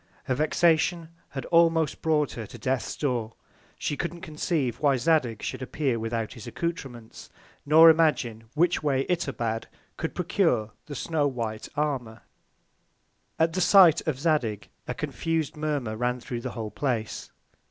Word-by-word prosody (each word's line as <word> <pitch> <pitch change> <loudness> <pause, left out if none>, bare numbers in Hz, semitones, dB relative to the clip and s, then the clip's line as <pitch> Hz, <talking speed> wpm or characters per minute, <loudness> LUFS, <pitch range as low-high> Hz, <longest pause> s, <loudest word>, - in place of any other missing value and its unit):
Her 130 - -1
Vexation 165 +3 +2 0.2
had 135 - -6
almost 165 -2 +3
brought 150 -3 +1
her 115 -3 -6
to - - -11
Death's 130 -2 -2
Door; 120 -6 -1 0.4
she 145 - -2
couldn't 170 +2 -4
conceive 155 -6 -2
why 140 -3 +3
Zadig 125 -5 +1
should - - -4
appear 130 -2 -1
without 115 0 -3
his 115 - -10
Accoutrements, 135 -10 -6 0.4
nor 160 +2 +8
imagine 150 -9 +3
which 175 +3 +2
Way 135 -3 +1
Itobad 120 -10 -2 0.3
could - - -4
procure 110 0 +1 0.2
the 145 - -6
snow 150 0 0
white 115 -5 -4
Armour. 135 -7 -2 1.1
At 165 0 +2
the 185 - 0
Sight 180 -5 +7
of 140 -4 -1
Zadig 135 - 0 0.2
a - - -3
confus'd 165 -3 -2
Murmur 145 -7 -2
ran 125 +2 -1
thro' 120 0 -5
the - - -5
whole 110 -2 -4
Place. 115 -3 -3
145 Hz, 145 wpm, -26 LUFS, 120-160 Hz, 1.1 s, nor